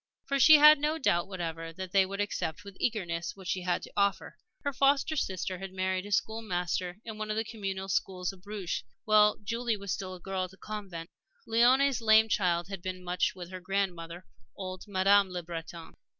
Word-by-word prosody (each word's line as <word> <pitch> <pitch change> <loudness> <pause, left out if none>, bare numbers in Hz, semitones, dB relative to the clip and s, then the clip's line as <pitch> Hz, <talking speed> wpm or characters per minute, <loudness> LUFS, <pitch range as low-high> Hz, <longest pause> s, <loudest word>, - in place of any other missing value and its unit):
For 275 0 0
she 310 +4 +9
had 300 0 +8
no 300 +2 0
doubt 175 - +1
whatever 165 -3 -5
that 185 +1 -7
they 195 -1 +4
would 200 +1 -6
accept 205 -3 -2
with 200 -1 -11
eagerness 170 -7 -2
what 190 -2 -11
she 185 - -1
had 180 -1 -1
to - - -10
offer. 200 -1 0 0.3
Her 285 -1 -1
foster 275 +3 +2
sister 185 - -2
had 195 0 -7
married 185 +1 -1
a - - -10
school 220 +3 0
master 180 -2 -2
in 220 -2 -7
one 215 0 -4
of 215 - -1
the 220 - +1
Communal 195 -4 -5
schools 185 0 -1
of 185 - -16
Bruges 200 -2 -4 0.2
while 210 -1 +5
Julie 230 +1 -1
was 200 -2 -3
still 185 -2 -5
a - - -12
girl 190 0 -3
at - - -10
the 190 - -17
convent. 195 -6 -7 0.4
Léonie's 250 +3 +4
lame 220 0 +5
child 175 -4 +1
had 195 -2 -6
been 185 0 -5
much 180 +1 0
with 180 -1 -9
her 185 - -6
grandmother, 180 -2 -3 0.3
old 185 -1 -6
Madame 200 0 +4
Le 180 -1 -5
Breton. 165 0 -8
195 Hz, 205 wpm, -30 LUFS, 180-215 Hz, 0.4 s, she